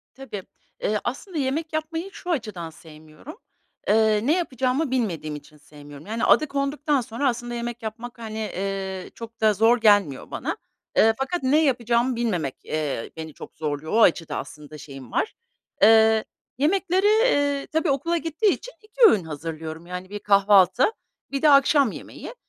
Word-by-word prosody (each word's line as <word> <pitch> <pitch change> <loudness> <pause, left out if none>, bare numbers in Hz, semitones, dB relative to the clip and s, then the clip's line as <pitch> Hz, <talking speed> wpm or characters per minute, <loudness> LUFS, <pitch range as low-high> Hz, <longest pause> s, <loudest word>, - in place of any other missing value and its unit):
Tabii, 225 -8 -7 0.4
ııı, 210 0 +1
aslında 310 +8 -5
yemek 300 +4 -2
yapmayı 325 +4 -3
şu 360 - -9
açıdan 210 - -3
sevmiyorum, 155 - -14 0.5
ııı, 220 +2 +3
ne 310 - +4
yapacağımı 265 -2 -1
bilmediğim 175 -12 -2
için 150 +1 -13
sevmiyorum. 145 0 -14
Yani, 225 +2 -3
adı 305 - +4
konduktan 280 0 0
sonra 235 +4 -2
aslında 240 0 -4
yemek 235 0 -5
yapmak, 235 +2 -7
hani, 220 -1 -6
eee, 195 -2 -4
çok 230 0 -10
da 215 -1 +5
zor 225 +4 +4
gelmiyor 205 - +3
bana, - - -3 0.4
eee, 225 0 +6
fakat 270 +4 -2
ne 295 +5 +3
yapacağımı 240 -2 +1
bilmemek, 180 - -1
eee, 150 -6 -3
beni 160 -2 -7
çok - - -12
zorluyor. 150 0 -4
O 230 - +4
açıdan 165 -5 +3
aslında 150 0 -10
şeyim 135 -4 -11
var. - - -1 0.5
Eee, 220 0 +6 0.3
yemekleri, 370 +6 +1
eee, 285 - +2
tabii 320 0 +1
okula 335 +5 0
gittiği 330 +6 +1
için - - -9
2 430 +3 -11
öğün 195 -5 +2
hazırlıyorum. 160 +1 -7
Yani, 180 +1 -7
1 205 - -6
kahvaltı, 200 - +4 0.4
1 275 - -2
de 305 - +5
akşam 275 -2 +5
yemeği. - - -9
225 Hz, 155 wpm, -24 LUFS, 180-280 Hz, 0.5 s, eee